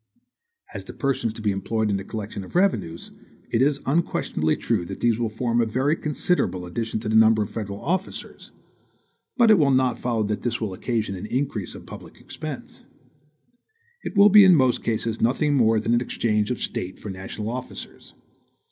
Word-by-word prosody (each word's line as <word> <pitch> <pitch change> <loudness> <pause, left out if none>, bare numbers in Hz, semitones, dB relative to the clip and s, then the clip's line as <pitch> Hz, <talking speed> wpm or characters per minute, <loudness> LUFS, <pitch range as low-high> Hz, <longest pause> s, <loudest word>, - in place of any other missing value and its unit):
As - - -6
to - - -9
persons 135 -5 -1
to 110 - -8
be 105 - +2
employed 105 +2 -1
in 100 - +1
the 95 - -5
collection 105 -1 -6
of - - -13
the - - +1
revenues, 85 - -1 0.4
it 115 - +2
is 145 +1 +2
unquestionably 135 - 0
true - - 0
that 95 +2 -7
these 115 -1 +2
will 115 -2 0
form 115 +2 0
a - - +2
very 130 +7 +1
considerable 150 - -1
addition 110 +5 -3
to 110 - -5
the 110 - 0
number 110 -1 +5
of 100 - -8
federal 100 -2 -5
officers; 185 +5 -3 0.9
but 235 -3 +6
it 210 - +6
will 145 -3 +4
not 130 -2 +2
follow 115 -3 0
that 105 0 -2
this 120 - -2
will 105 -4 -3
occasion 110 0 -2
an 95 +3 -6
increase 125 -7 -2
of - - -11
public - - -11
expense. - - -8 1.2
It - - -6
will 200 +1 +8
be 210 0 +9
in 185 -2 +7
most 130 -5 +2
cases 115 0 -2
nothing 145 +5 +2
more 115 -5 +3
than 115 +2 0
an 120 - +3
exchange 105 -4 0
of 125 - -1
State 95 +1 -3
for 105 - -7
national 95 +3 -6
officers. 125 +1 -8
115 Hz, 190 wpm, -24 LUFS, 105-135 Hz, 1.2 s, be